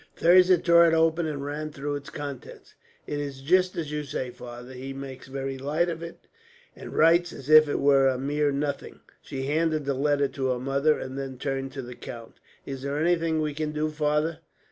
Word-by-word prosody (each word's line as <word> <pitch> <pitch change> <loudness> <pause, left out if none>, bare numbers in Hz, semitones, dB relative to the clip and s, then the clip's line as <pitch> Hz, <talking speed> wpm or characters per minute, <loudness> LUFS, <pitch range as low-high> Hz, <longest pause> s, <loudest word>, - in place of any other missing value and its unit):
Thirza 180 +1 +6
tore 170 0 +5
it 165 - +3
open, 165 +1 +2
and 140 -2 -4
ran 150 +2 -4
through 145 0 -4
its 145 0 -7
contents. 140 -3 -8 0.3
"It 145 - -3
is 140 -2 -5
just 180 +6 +2
as 155 -3 -3
you 150 0 -2
say, 130 -3 -4
father. 120 +1 -10
He 130 +1 -7
makes 135 -1 -8
very 135 0 -4
light 155 +6 0
of 165 -1 -5
it, 170 0 -9 0.5
and - - -9
writes 170 +2 +4
as 140 +3 -7
if 155 -1 +8
it - - 0
were 135 -1 +5
a 130 -1 +1
mere 145 +2 0
nothing." 140 +1 -4 0.2
She 135 -1 -6
handed 155 +1 0
the 140 - 0
letter 145 +1 +1
to 135 -1 -3
her 125 -1 0
mother, 140 +4 +1
and 130 +1 -6
then 135 -1 -6
turned 135 0 -3
to 135 - -5
the 125 +1 -8
count. 115 -1 -10 0.3
"Is 135 -1 -6
there 140 +1 -3
anything 165 0 +1
we 150 -1 -2
can 150 +1 -3
do, 155 0 -1
father?" 150 +1 0
145 Hz, 210 wpm, -26 LUFS, 135-155 Hz, 0.5 s, if